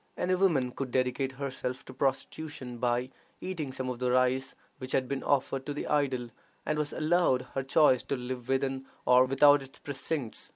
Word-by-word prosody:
Any 185 - +1
woman 165 -10 +2
could 135 +1 -4
dedicate 130 +1 0
herself 130 -1 -4
to 130 - -10
prostitution 135 -1 -3
by 125 +1 0 0.3
eating 165 -7 -4
some 130 0 -4
of 125 -1 -4
the 125 0 0
rice 130 +1 +2 0.2
which 130 0 -5
had 130 -1 +1
been 140 0 -2
offered 135 -1 0
to 145 - -3
the - - -3
idol, 130 -5 0 0.3
and 155 0 0
was 150 -1 -1
allowed 155 -5 +2
her 135 - 0
choice 135 -1 +4
to 140 - -1
live 125 -1 -5
within 135 0 0 0.2
or 125 +1 +6
without 145 +2 +5
its 135 0 -11
precincts. 140 -3 -4
135 Hz, 180 wpm, -30 LUFS, 125-145 Hz, 0.3 s, or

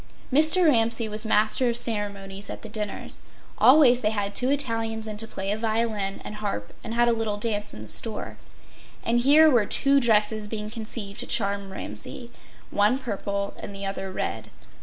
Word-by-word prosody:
Mr. 315 +5 +5
Ramsay 230 -4 +2
was 215 +1 -1
master 220 +4 +2
of 235 - 0
ceremonies 200 -3 -2
at - - -7
the 220 - -8
dinners. 210 -1 -5 0.4
Always 255 -3 +6
they 215 - +2
had 205 -2 -2
two 255 - +1
Italians 225 -5 -1
in 215 -1 -6
to 225 +1 -1
play 195 -2 -3
a 210 - -1
violin 220 -3 -2
and 210 - -7
harp 200 - -4
and 225 0 -5
had 240 0 +3
a 235 - +3
little 220 -2 -2
dance 210 -1 -1
in 105 - -9
the - - -10
store. 220 - -1 0.7
And 235 +1 +2
here 295 +5 +6
were 240 -8 +3
two 275 0 +4
dresses 215 -3 +1
being 210 0 -5
conceived 215 -3 -6
to - - -2
charm 200 -2 +1
Ramsay—one 205 - -3
purple 200 -5 -4
and 200 - -8
the 195 0 -5
other 195 -1 -4
red. 110 - -4
220 Hz, 180 wpm, -25 LUFS, 200-235 Hz, 0.7 s, Always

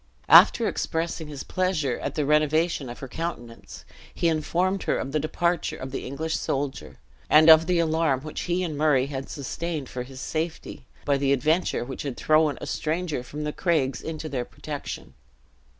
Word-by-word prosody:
After - - +8
expressing 165 -1 -2
his 145 -2 -7
pleasure 180 -9 -1
at - - -4
the 150 - 0
renovation 150 -1 +2
in 120 - -6
her 135 - -8
countenance, 125 -6 -7 0.3
he 170 - +1
informed 175 +5 0
her - - 0
of 135 - -4
the 155 - +1
departure 170 +3 -1
of 130 0 -7
the - - -5
English 160 +4 -3
soldier, 135 0 -3 0.3
and 155 +1 +8
of 160 +1 +7
the 180 -1 +2
alarm 160 -5 +1
which 155 +1 -6
he 180 +1 +1
and 160 -4 -3
Murray 145 -3 +3
had 135 -1 -6
sustained 150 0 -4
for 125 - -5
his 130 +1 -9
safety, 160 +4 -4 0.2
by 140 -1 +2
the 135 0 +1
adventure 150 +1 +1
which 130 +1 -6
had 140 -4 -5
thrown 155 -1 +3
a - - -6
stranger 160 -3 -2
from 145 +5 -7
the 150 0 -3
craigs 140 -8 0
into 160 -1 -5
their 130 -5 -2
protection. - - -7
155 Hz, 180 wpm, -25 LUFS, 135-165 Hz, 0.3 s, After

